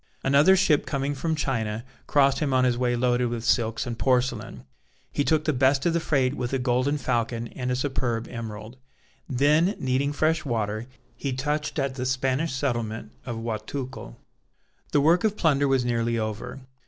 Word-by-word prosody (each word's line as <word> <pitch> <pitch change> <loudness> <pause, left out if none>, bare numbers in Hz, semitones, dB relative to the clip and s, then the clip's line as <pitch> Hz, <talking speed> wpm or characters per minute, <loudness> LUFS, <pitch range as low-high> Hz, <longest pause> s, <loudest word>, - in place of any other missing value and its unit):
Another 145 +8 +5
ship 155 -6 +3
coming 140 0 -1
from 160 +3 -1
China 115 -6 -2 0.2
crossed 140 -2 +3
him 140 -4 0
on 130 - +4
his 125 -1 +3
way 120 0 0
loaded 125 0 +1
with 120 -1 -4
silks 115 -2 +1
and 120 -2 -5
porcelain. 120 - 0 0.5
He 145 - 0
took 155 0 +1
the 155 - +2
best 135 +1 +2
of 170 - +2
the 170 - +2
freight 135 -5 +1
with 125 -4 -3
a - - +2
golden 130 +3 +1
falcon 115 -3 -1
and 125 -1 -4
a 125 - +1
superb 125 -4 -1
emerald. 115 0 -7 0.5
Then 150 - +3
needing 130 +2 0
fresh 155 +2 +1
water 110 -3 -2 0.3
he 135 -2 -3
touched 150 +4 -2
at 135 -2 0
the 130 -1 -3
Spanish 135 +4 0
settlement 115 -5 -2 0.2
of 115 -2 -4
Guatulco. 120 - -5 0.8
The 145 - +3
work 165 +4 +4
of 215 -1 +1
plunder 145 -4 +3
was 135 -2 +2
nearly 115 -1 0
over. 110 +4 -4
130 Hz, 175 wpm, -25 LUFS, 120-145 Hz, 0.8 s, Another